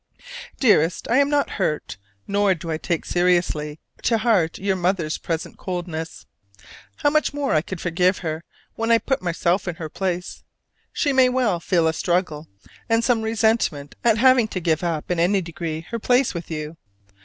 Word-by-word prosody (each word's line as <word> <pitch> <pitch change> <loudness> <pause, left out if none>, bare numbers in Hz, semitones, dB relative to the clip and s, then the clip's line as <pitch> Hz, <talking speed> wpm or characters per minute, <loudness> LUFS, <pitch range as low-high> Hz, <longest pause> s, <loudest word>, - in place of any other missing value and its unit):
Dearest, 180 - +3
I 245 - +4
am 280 0 +4
not 290 -1 +2
hurt, 150 -5 -1 0.3
nor 200 -1 +2
do 165 0 -6
I 155 - -2
take 170 -1 -2
seriously 175 -4 +1 0.2
to 230 - +2
heart 210 -8 +2
your 195 0 0
mother's 175 -4 -1
present 165 -1 -4
coldness. 170 -3 -5 0.7
How 290 - +1
much 305 -1 +1
more 285 -1 0
I 155 - +3
could 175 +2 -7
forgive 180 +2 +1
her 160 +1 -3 0.3
when 225 0 -2
I 230 - +6
put 265 +3 -1
myself 175 +2 0
in 175 - -2
her 165 -2 -6
place! 180 +1 -4 0.5
She 285 -3 0
may 260 -1 +5
well 245 -8 +1
feel 170 -1 +1
a 160 - +1
struggle 165 -3 -1 0.4
and 225 0 +3
some 235 -2 +2
resentment 220 -10 0
at 230 -2 +4
having 255 -1 +5
to 195 - -4
give 160 -1 0
up 165 -1 -2
in 175 - 0
any 190 +4 +3
degree 165 -2 -5
her 230 - -2
place 250 +3 +2
with 170 -2 -6
you. 155 0 -5
180 Hz, 175 wpm, -22 LUFS, 165-225 Hz, 0.7 s, I